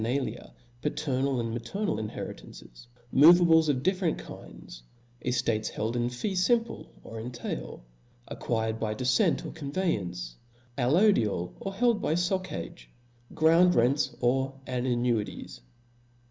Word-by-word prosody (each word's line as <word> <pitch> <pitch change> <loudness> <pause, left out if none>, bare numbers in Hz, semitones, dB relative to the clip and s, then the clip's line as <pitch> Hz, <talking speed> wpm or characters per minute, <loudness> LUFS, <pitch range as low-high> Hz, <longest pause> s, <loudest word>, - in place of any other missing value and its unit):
nalia, 130 +4 -3 0.3
paternal 140 -3 -1
and 115 -1 -2
maternal 120 - -2
inheritances; 105 - -8 0.2
move*. 155 +6 +8
ables 160 -3 +4
of 130 -3 0
different 185 -2 +1
kinds - - -11 0.4
5 125 - 0
eftates 115 -3 0
held 110 +3 -3
in 120 0 0
fee 125 - -3
fimple, 230 +5 0 0.2
or 115 - -8
in 115 +2 -5
tail; 120 - -6 0.4
acquired 110 -1 -2
by 110 -1 -2
defcent 125 +2 +1
or - - -5
conveyance; 100 - -3 0.4
al 125 0 +1
lodial, 120 - +2
or 195 - -4
held 235 0 +2
by 155 - 0
foccage; 180 -1 -3 0.5
ground 165 +3 +5
rents, 125 +5 +2
or 135 +2 0
an 125 -1 -2
nuities. 120 -3 -1
130 Hz, 130 wpm, -28 LUFS, 115-170 Hz, 0.5 s, move